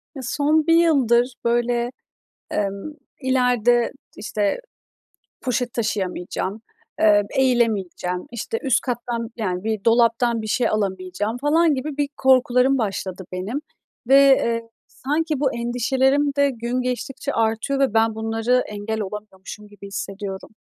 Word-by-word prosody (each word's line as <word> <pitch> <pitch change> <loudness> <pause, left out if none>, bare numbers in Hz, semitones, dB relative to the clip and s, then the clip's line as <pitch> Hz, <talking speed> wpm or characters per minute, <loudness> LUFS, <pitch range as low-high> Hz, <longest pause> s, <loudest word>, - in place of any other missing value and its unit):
Ya, 270 - -6
son 300 +4 +1
1 330 - +5
yıldır, 260 -7 +3
böyle, 240 0 +1 0.6
emm, 200 +8 -3 0.3
ileride, 245 -2 +2 0.3
işte, 210 - -1 0.8
poşet 245 -1 -1
taşıyamayacağım, 200 -1 -3 0.4
eee, 210 -1 +5
eğilemeyeceğim, 215 -8 0
işte, 240 - -4
üst 265 -5 +2
kattan, 240 -2 -3
yani, 185 -4 -3
bir 215 -2 -2
dolaptan 230 0 +3
bir - - -5
şey 235 +3 +1
alamayacağım 200 +1 -2
falan 310 +3 +3
gibi 275 +2 -4
bir 290 -1 0
korkularım 260 0 +4
başladı 195 -4 -3
benim 195 +10 -3 0.5
ve, 270 - +6
eee, 235 -4 +3 0.2
sanki 295 +6 -2
bu 275 -3 +1
endişelerim 265 +4 +1
de 280 0 +3
gün 240 0 -3
geçtikçe 250 +1 -3
artıyor 225 +5 0
ve 270 -5 +2
ben 225 0 +3
bunları 225 +3 +1
engel 210 +1 -4
olamıyormuşum 210 0 -8
gibi 205 -1 -12
hissediyorum. 195 -1 -6
235 Hz, 125 wpm, -22 LUFS, 210-260 Hz, 0.8 s, ve